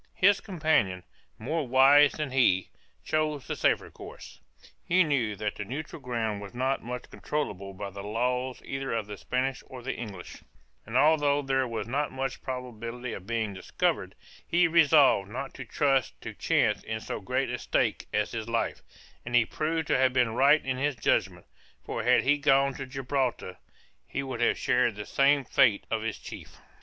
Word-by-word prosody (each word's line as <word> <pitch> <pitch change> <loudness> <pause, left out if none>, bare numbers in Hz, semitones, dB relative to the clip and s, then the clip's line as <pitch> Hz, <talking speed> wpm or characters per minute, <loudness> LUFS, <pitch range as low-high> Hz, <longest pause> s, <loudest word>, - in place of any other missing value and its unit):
His 200 +1 +4
companion, 155 - 0 0.3
more 145 +6 -2
wise 135 +3 +6
than 150 -4 -4
he, 120 -8 +3 0.4
chose 155 -3 -1
the - - -3
safer - - +1
course; - - -11 0.4
he 185 +2 +4
knew 130 -9 0
that 105 +1 -3
the 105 - -3
neutral 145 +8 -6
ground 115 -5 -2
was 100 +3 -10
not 130 +2 0
much 125 +1 -7
controllable 100 -10 -4
by 100 +1 -6
the 100 +1 -8
laws 125 +5 -2
either 135 -1 -3
of 115 -2 -1
the 105 0 -7
Spanish 130 +5 -2
or 125 -2 -10
the 135 - -2
English, 100 -7 -8 0.5
and 115 +3 -1
although 145 -1 +3
there 135 -1 +1
was 115 -1 -4
not 145 +4 -1
much 135 0 -4
probability 125 -2 -6
of 95 - -9
being 115 -3 -1
discovered, 95 - -2 0.3
he 175 +1 +3
resolved 150 - +5
not 130 +5 -6
to - - -8
trust 135 - 0
to - - -7
chance - - +1
in - - -4
so - - -5
great - - -1
a - - -3
stake - - 0
as 105 0 0
his 115 -1 -5
life; 115 0 -1 0.4
and 120 +1 -3
he 120 -2 +5
proved 160 +4 -2
to - - +2
have 130 -1 +3
been 125 -3 +2
right 140 +5 +4
in 130 -1 -1
his 145 +1 0
judgment, 105 - 0 0.4
for - - -3
had 125 +3 +4
he 145 +2 +3
gone 135 0 +3
to 135 0 -7
Gibraltar, 130 -6 -2 0.5
he 140 - -3
would 130 -3 -5
have 120 - +3
shared 125 -3 +1
the 105 0 -6
same 140 0 +3
fate 120 -6 +3
of 110 -1 0
his 115 0 -3
chief. - - -10
130 Hz, 180 wpm, -28 LUFS, 115-140 Hz, 0.5 s, wise